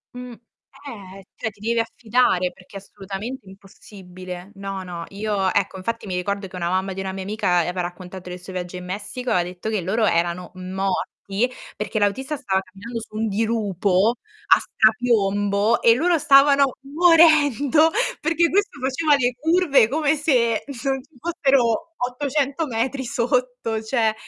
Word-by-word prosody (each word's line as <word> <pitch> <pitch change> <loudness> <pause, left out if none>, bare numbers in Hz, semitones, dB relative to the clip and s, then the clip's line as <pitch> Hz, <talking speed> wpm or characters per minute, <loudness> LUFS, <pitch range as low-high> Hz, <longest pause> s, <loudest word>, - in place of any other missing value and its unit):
Mh, 250 0 -7 0.5
eh, 195 -6 -10
cioè 220 - -3
ti 205 -1 -21
devi 230 +2 0
affidare, 225 -5 +1
perché 185 +2 -19
è - - -6
assolutamente 200 +4 -8
impossibile. 185 -1 -11
No, 195 -1 -5
no, 175 -2 -7
io, 200 -2 -1
ecco, 195 -1 0
infatti 225 +5 -4
mi 185 -3 -4
ricordo 200 +2 -2
che 185 - -12
una 170 -1 -2
mamma 190 +1 -1
di 190 - -7
una 190 0 -4
mia 190 0 -5
amica, 195 -3 0
aveva 180 +2 -1
raccontato 180 +1 -7
del 180 0 -7
suo 180 +1 -10
viaggio 180 0 -5
in 180 0 -7
Messico, 205 +7 -5
e - - +3
ha 180 - +2
detto 180 +4 -6
che 215 -4 -1
loro 215 +6 0
erano 175 -1 0
morti, 195 +4 -2 0.3
perché 210 +1 -4
l'autista 260 +8 0
stava 195 -8 0
camminando 200 +5 -8
su 215 -1 -12
un 220 +1 -1
dirupo 210 -1 +1 0.4
a - - -1
strapiombo 210 -2 +2
e 230 0 +6
loro 340 +5 +2
stavano 275 -2 +5
morendo 310 -2 +4 0.3
perché 330 +2 +2
questo 405 +2 0
faceva 285 +3 +2
le 250 -2 +1
curve 320 -6 +4
come 300 +3 +1
se 245 -7 +1 0.2
non 270 -1 0
ci 285 - -28
fossero 275 -1 +1
800 280 +4 -1
metri 260 +3 -2
sotto, 245 -2 -1
cioè 220 -1 +1
220 Hz, 160 wpm, -22 LUFS, 190-265 Hz, 0.5 s, e